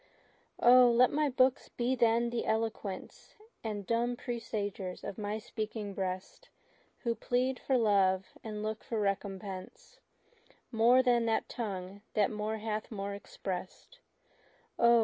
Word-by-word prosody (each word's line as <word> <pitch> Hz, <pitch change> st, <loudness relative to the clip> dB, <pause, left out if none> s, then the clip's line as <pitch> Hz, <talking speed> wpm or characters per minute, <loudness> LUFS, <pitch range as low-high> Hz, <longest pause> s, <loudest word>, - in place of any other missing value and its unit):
O! 245 Hz, 0 st, +8 dB
let 240 Hz, +1 st, +5 dB
my 295 Hz, -1 st, +1 dB
looks 255 Hz, 0 st, +3 dB
be 245 Hz, +2 st, 0 dB
then 235 Hz, -1 st, +3 dB
the 235 Hz, -, -2 dB
eloquence 220 Hz, -3 st, -3 dB, 0.3 s
And 210 Hz, -3 st, -4 dB
dumb 235 Hz, +2 st, +1 dB
presagers 205 Hz, -7 st, -4 dB
of 200 Hz, -, -6 dB
my 210 Hz, 0 st, -2 dB
speaking 215 Hz, -2 st, -5 dB
breast, 190 Hz, -, -4 dB, 0.5 s
Who 235 Hz, -2 st, +1 dB
plead 250 Hz, +3 st, 0 dB
for 265 Hz, -, +1 dB
love, 195 Hz, -4 st, +3 dB, 0.2 s
and 215 Hz, -1 st, -5 dB
look 215 Hz, +1 st, -3 dB
for 225 Hz, -, -2 dB
recompense, 195 Hz, -, -4 dB, 0.7 s
More 240 Hz, +3 st, +5 dB
than 240 Hz, -2 st, +3 dB
that 225 Hz, -, +1 dB
tongue 200 Hz, -3 st, -5 dB
that 210 Hz, -1 st, +3 dB
more 215 Hz, +1 st, -2 dB
hath 215 Hz, 0 st, -3 dB
more 200 Hz, -1 st, -4 dB
express'd. 195 Hz, -, -7 dB, 0.8 s
O! 235 Hz, 0 st, +6 dB
220 Hz, 130 wpm, -32 LUFS, 200-240 Hz, 0.8 s, O